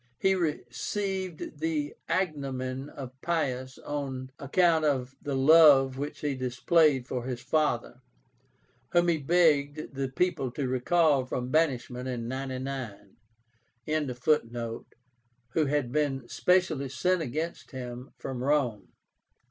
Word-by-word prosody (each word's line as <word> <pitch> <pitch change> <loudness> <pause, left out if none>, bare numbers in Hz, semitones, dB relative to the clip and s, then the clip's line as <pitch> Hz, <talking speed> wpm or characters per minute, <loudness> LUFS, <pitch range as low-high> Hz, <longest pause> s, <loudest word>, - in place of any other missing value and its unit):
He 190 - +3
received 175 - -3
the 155 -2 -1 0.2
agnomen 135 -6 -2
of 130 -3 -8
Pius 130 -6 -1
on 135 -3 -5
account 160 +3 +3
of 135 -3 0
the 140 -1 -3
love 135 -2 +6
which 145 +1 -5
he 145 -2 0
displayed 130 +2 +2
for 125 -3 -3
his 125 -2 -3
father, 125 -3 0 0.9
whom 175 0 +4
he 165 -2 +2
begged 150 -2 +2
the 135 0 -2
people 135 -1 0
to 140 -1 -2
recall 140 +2 +3
from 125 0 -3
banishment 130 -5 0
in 120 -2 -3
99.) 130 -6 -5 0.7
who 125 -2 -2
had 140 -4 0
been 135 -4 0
specially 140 +3 +1
sent 180 +7 +1
against 160 +4 -4
him 125 0 -7
from 125 -1 -5
Rome. 125 -9 0
135 Hz, 115 wpm, -28 LUFS, 125-155 Hz, 0.9 s, love